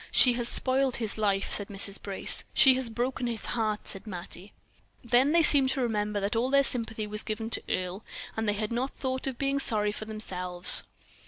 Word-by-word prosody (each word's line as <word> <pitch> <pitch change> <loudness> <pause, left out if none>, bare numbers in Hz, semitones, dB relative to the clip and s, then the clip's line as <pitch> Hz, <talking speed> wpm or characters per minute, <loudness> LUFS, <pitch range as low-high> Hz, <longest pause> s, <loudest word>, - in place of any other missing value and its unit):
"She 250 - +5
has 240 0 -2
spoiled 260 0 +1
his 225 -3 -4
life," 200 -2 0
said 205 - -2
Mrs. 200 0 -1
Brace. 195 -2 -3
"She 265 - +7
has 255 -2 -3
broken 245 +2 -3
his 230 -2 -3
heart," 215 -3 -2
said 195 +2 -2
Mattie. 185 0 -6 0.5
Then 250 +4 +2
they 335 0 +4
seemed 275 -3 +8
to 270 - -3
remember 210 -3 -1
that 200 +3 -2
all 240 +3 0
their 275 0 +4
sympathy 225 -4 0
was 210 +1 -3
given 220 +1 -5
to - - +1
Earle, 185 +3 -3 0.3
and 220 -1 -2
they - - +1
had 210 +1 -4
not 250 +3 -3
thought 260 0 -3
of 260 -3 -4
being 275 0 -1
sorry 210 -5 +2
for 215 - -7
themselves. 180 -5 +1
225 Hz, 200 wpm, -27 LUFS, 210-255 Hz, 0.5 s, seemed